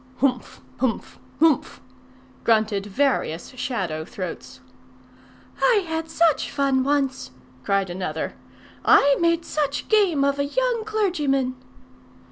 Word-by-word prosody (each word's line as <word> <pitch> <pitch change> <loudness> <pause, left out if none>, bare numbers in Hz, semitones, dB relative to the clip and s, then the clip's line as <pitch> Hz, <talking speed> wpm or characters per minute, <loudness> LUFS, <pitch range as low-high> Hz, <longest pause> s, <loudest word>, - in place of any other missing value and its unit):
"Humph! 255 -2 -1 0.2
Humph! 250 -2 -2 0.2
Humph!" 320 -3 +2 0.6
grunted 215 -3 +1
various 205 - 0
shadow 210 -12 -3
throats. 180 +1 -7 1.0
"I 430 -6 +3
had 320 0 -3
such 325 -2 +2
fun 270 -2 +1
once!" 275 -1 0 0.3
cried 195 +1 0
another. 175 -3 -4 0.5
"I 280 0 +6
made 335 -1 +2
such 285 -2 -2
game 390 -10 +3
of 280 0 +1
a 280 - +1
young 480 +6 -1
clergyman!" 300 -12 0
275 Hz, 105 wpm, -23 LUFS, 225-325 Hz, 1.0 s, I